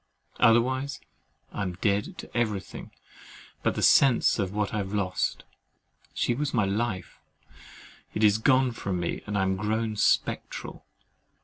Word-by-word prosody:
Otherwise, 130 Hz, +4 st, +3 dB, 0.5 s
I -, -, -5 dB
am 95 Hz, -2 st, -2 dB
dead 100 Hz, -, -1 dB
to -, -, -11 dB
every 110 Hz, -4 st, +1 dB
thing -, -, -10 dB, 0.7 s
but -, -, 0 dB
the -, -, -2 dB
sense 130 Hz, -4 st, +5 dB
of 95 Hz, -2 st, -1 dB
what 105 Hz, 0 st, -2 dB
I -, -, -1 dB
have 100 Hz, 0 st, -3 dB
lost. 95 Hz, -2 st, -1 dB, 0.7 s
She 120 Hz, -, +1 dB
was 140 Hz, +1 st, -2 dB
my 110 Hz, -5 st, +3 dB
life—it 105 Hz, +1 st, -6 dB
is 105 Hz, 0 st, +5 dB
gone 130 Hz, +1 st, +3 dB
from 95 Hz, -5 st, -3 dB
me, 85 Hz, -, -3 dB
and 105 Hz, -1 st, -2 dB
I 95 Hz, -, +2 dB
am 95 Hz, 0 st, 0 dB
grown 110 Hz, +2 st, -1 dB
spectral! -, -, -1 dB
105 Hz, 145 wpm, -27 LUFS, 100-120 Hz, 0.7 s, sense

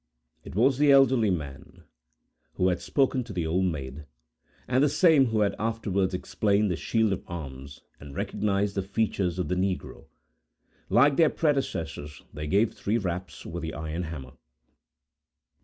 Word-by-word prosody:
It -, -, -10 dB
was 130 Hz, +5 st, +3 dB
the 145 Hz, -1 st, +5 dB
elderly 130 Hz, -5 st, +5 dB
man, 75 Hz, -7 st, -5 dB, 0.7 s
who 90 Hz, -, +2 dB
had 90 Hz, -, -1 dB
spoken 135 Hz, -2 st, +1 dB
to -, -, -9 dB
the 85 Hz, -3 st, -2 dB
Old 90 Hz, +4 st, +1 dB
Maid, 75 Hz, -3 st, -4 dB, 0.6 s
and 130 Hz, +2 st, +3 dB
the 150 Hz, -, +4 dB
same 155 Hz, -4 st, +5 dB
who 110 Hz, -2 st, 0 dB
had 100 Hz, -, +2 dB
afterwards 100 Hz, -4 st, -1 dB
explained 100 Hz, +2 st, +1 dB
the -, -, 0 dB
shield 110 Hz, +4 st, +1 dB
of 95 Hz, -, -5 dB
arms, 70 Hz, -4 st, -8 dB, 0.2 s
and 70 Hz, -1 st, -11 dB
recognized 100 Hz, -1 st, -1 dB
the 100 Hz, -, -1 dB
features 95 Hz, -3 st, -1 dB
of 90 Hz, -4 st, -1 dB
the 90 Hz, -, -1 dB
negro. 95 Hz, 0 st, -3 dB, 0.8 s
Like 135 Hz, +7 st, +4 dB
their 160 Hz, -2 st, +5 dB
predecessors, 80 Hz, -, -2 dB
they 75 Hz, 0 st, -5 dB
gave 100 Hz, +7 st, +2 dB
three 105 Hz, +3 st, -1 dB
raps, 90 Hz, -5 st, -5 dB
with 85 Hz, +1 st, -5 dB
the 80 Hz, 0 st, -5 dB
iron 80 Hz, +3 st, -4 dB
hammer. 75 Hz, -7 st, -7 dB
95 Hz, 155 wpm, -27 LUFS, 80-115 Hz, 0.8 s, the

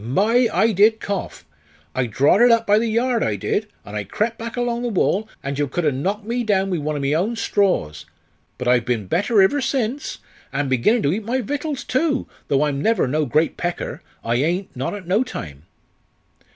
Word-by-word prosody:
My! 220 Hz, -, +2 dB
I 225 Hz, +1 st, +3 dB
did 215 Hz, +3 st, +4 dB
cough. 200 Hz, -, -4 dB, 0.5 s
I 125 Hz, -1 st, 0 dB
drawed 140 Hz, -, +3 dB
it 245 Hz, -, +7 dB
up 230 Hz, -1 st, +4 dB
by 210 Hz, 0 st, +4 dB
the 230 Hz, -, 0 dB
yard, 235 Hz, +1 st, +1 dB
I 105 Hz, -, 0 dB
did 100 Hz, -, -1 dB, 0.2 s
and 105 Hz, -, -8 dB
I 105 Hz, -, -2 dB
crep' 220 Hz, -, -2 dB
back 230 Hz, +1 st, -7 dB
along 240 Hz, -1 st, -1 dB
the 245 Hz, -, -1 dB
wall, 215 Hz, 0 st, 0 dB
and 140 Hz, +1 st, -3 dB
yo 145 Hz, -, +1 dB
cud 175 Hz, +6 st, -2 dB
ha' 150 Hz, -3 st, +2 dB
knocked 195 Hz, +10 st, -2 dB
me 240 Hz, +2 st, -1 dB
down 195 Hz, -3 st, +1 dB
wi' 175 Hz, -, 0 dB
one 150 Hz, +1 st, -2 dB
o' -, -, -2 dB
my 140 Hz, +1 st, 0 dB
own 195 Hz, +9 st, 0 dB
straws. 190 Hz, -, 0 dB, 0.5 s
But 125 Hz, -, -4 dB
I've 125 Hz, -1 st, +4 dB
been 120 Hz, -4 st, -1 dB
better 200 Hz, -, +3 dB
iver 285 Hz, +9 st, +2 dB
since, 260 Hz, +2 st, -2 dB, 0.3 s
an' 140 Hz, 0 st, -1 dB
beginnin' 130 Hz, -, +2 dB
to 140 Hz, -, +2 dB
eat 215 Hz, +3 st, -3 dB
my 245 Hz, +5 st, -1 dB
vittles, 285 Hz, +3 st, -3 dB
too, 285 Hz, 0 st, 0 dB, 0.2 s
though 140 Hz, +1 st, +2 dB
I'm 140 Hz, -2 st, -2 dB
never 225 Hz, -, +2 dB
no 150 Hz, +3 st, 0 dB
great 155 Hz, +7 st, +1 dB
pecker 175 Hz, 0 st, -3 dB, 0.2 s
I 115 Hz, +1 st, 0 dB
ain't 170 Hz, +6 st, -1 dB
not 130 Hz, +10 st, -3 dB
at 200 Hz, -3 st, -8 dB
no 200 Hz, +7 st, +3 dB
time." 75 Hz, -, -8 dB
195 Hz, 210 wpm, -21 LUFS, 140-230 Hz, 0.5 s, it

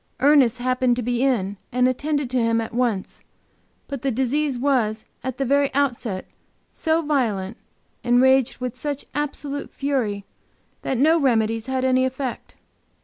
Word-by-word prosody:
Ernest 265 Hz, -3 st, +5 dB
happened 255 Hz, 0 st, +1 dB
to 245 Hz, -, -3 dB
be 245 Hz, +1 st, -1 dB
in 210 Hz, -7 st, +1 dB
and 250 Hz, +1 st, +3 dB
attended 285 Hz, +2 st, -1 dB
to 255 Hz, -1 st, +1 dB
him 230 Hz, 0 st, +2 dB
at 225 Hz, -, -4 dB
once. 235 Hz, -5 st, -1 dB, 0.7 s
But 275 Hz, -3 st, -5 dB
the 275 Hz, -, 0 dB
disease 265 Hz, +3 st, 0 dB
was, 240 Hz, -5 st, 0 dB, 0.2 s
at 260 Hz, -1 st, -4 dB
the 275 Hz, -, -1 dB
very 280 Hz, +1 st, +2 dB
outset, 240 Hz, -8 st, -1 dB, 0.5 s
so 320 Hz, 0 st, 0 dB
violent, 225 Hz, -9 st, 0 dB, 0.5 s
and 245 Hz, 0 st, +3 dB
raged 260 Hz, -1 st, +4 dB
with 250 Hz, -1 st, -4 dB
such 290 Hz, -2 st, -4 dB
absolute 285 Hz, 0 st, -4 dB
fury, 235 Hz, -8 st, -2 dB, 0.6 s
that 265 Hz, -, -2 dB
no 315 Hz, +6 st, +4 dB
remedies 225 Hz, -4 st, +1 dB
had 260 Hz, 0 st, -1 dB
any 255 Hz, 0 st, +3 dB
effect. 260 Hz, -1 st, -4 dB
255 Hz, 150 wpm, -23 LUFS, 235-280 Hz, 0.7 s, Ernest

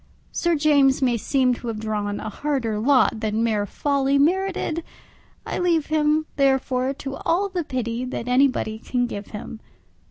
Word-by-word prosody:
Sir 345 Hz, -1 st, +1 dB
James 285 Hz, -3 st, +4 dB
may 245 Hz, -2 st, +3 dB
seem 255 Hz, +2 st, +1 dB
to 240 Hz, -, -7 dB
have 225 Hz, -2 st, -3 dB
drawn 210 Hz, -2 st, -2 dB
a -, -, -5 dB
harder 235 Hz, -4 st, -2 dB
lot 255 Hz, -2 st, +3 dB
than 220 Hz, +1 st, -1 dB
mere 210 Hz, -3 st, 0 dB
folly 280 Hz, +3 st, +1 dB
merited; 340 Hz, +1 st, +1 dB, 0.6 s
I -, -, -3 dB
leave 335 Hz, -4 st, +2 dB
him, 305 Hz, 0 st, +2 dB
therefore, 265 Hz, -1 st, +2 dB
to 275 Hz, -1 st, -6 dB
all 390 Hz, +4 st, 0 dB
the 360 Hz, -3 st, -2 dB
pity 245 Hz, -3 st, -3 dB
that 250 Hz, -1 st, -5 dB
anybody 250 Hz, -4 st, +2 dB
can 245 Hz, +1 st, -1 dB
give 205 Hz, -3 st, -6 dB
him. 215 Hz, +1 st, -8 dB
265 Hz, 160 wpm, -23 LUFS, 230-300 Hz, 0.6 s, James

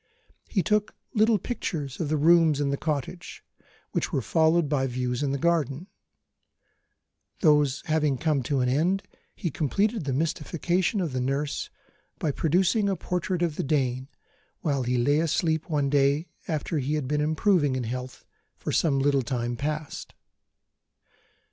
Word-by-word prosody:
He 190 Hz, -, +1 dB
took 210 Hz, -1 st, +1 dB, 0.2 s
little 220 Hz, -1 st, +4 dB
pictures 155 Hz, -, -4 dB
of 160 Hz, -4 st, -2 dB
the 155 Hz, -, +1 dB
rooms 160 Hz, -1 st, +5 dB
in 140 Hz, -1 st, 0 dB
the -, -, +1 dB
cottage, 155 Hz, +4 st, -4 dB, 0.5 s
which -, -, -1 dB
were 130 Hz, -, -1 dB
followed 160 Hz, +2 st, +3 dB
by 135 Hz, -2 st, +1 dB
views 125 Hz, 0 st, -2 dB
in 140 Hz, -2 st, 0 dB
the 140 Hz, -, 0 dB
garden. 160 Hz, -1 st, 0 dB, 1.6 s
Those 150 Hz, -5 st, +3 dB
having 155 Hz, -3 st, +1 dB
come 150 Hz, -1 st, +1 dB
to 140 Hz, -3 st, +2 dB
an 125 Hz, -, +1 dB
end, 170 Hz, +10 st, +1 dB, 0.3 s
he 170 Hz, -, -3 dB
completed 200 Hz, -, 0 dB
the 140 Hz, -, -1 dB
mystification 170 Hz, -, 0 dB
of 165 Hz, -7 st, -2 dB
the 130 Hz, -, -1 dB
nurse 140 Hz, +3 st, -2 dB, 0.5 s
by 150 Hz, -, 0 dB
producing 185 Hz, -, +2 dB
a 195 Hz, -, +1 dB
portrait 180 Hz, 0 st, -2 dB
of 165 Hz, -3 st, -1 dB
the -, -, -1 dB
Dane, 130 Hz, -3 st, 0 dB, 0.5 s
while 140 Hz, -4 st, 0 dB
he 125 Hz, 0 st, 0 dB
lay 145 Hz, +5 st, +3 dB
asleep 160 Hz, 0 st, 0 dB
one 145 Hz, -3 st, +1 dB
day 140 Hz, +2 st, +2 dB, 0.2 s
after 155 Hz, -1 st, -1 dB
he 140 Hz, +3 st, -1 dB
had 150 Hz, -4 st, -2 dB
been 150 Hz, +2 st, 0 dB
improving 155 Hz, -2 st, +2 dB
in 130 Hz, -, -2 dB
health 125 Hz, +2 st, -6 dB, 0.3 s
for -, -, -4 dB
some 145 Hz, -4 st, +2 dB
little 140 Hz, 0 st, +2 dB
time 120 Hz, -1 st, -2 dB
past. 150 Hz, +3 st, -4 dB
150 Hz, 155 wpm, -26 LUFS, 135-170 Hz, 1.6 s, rooms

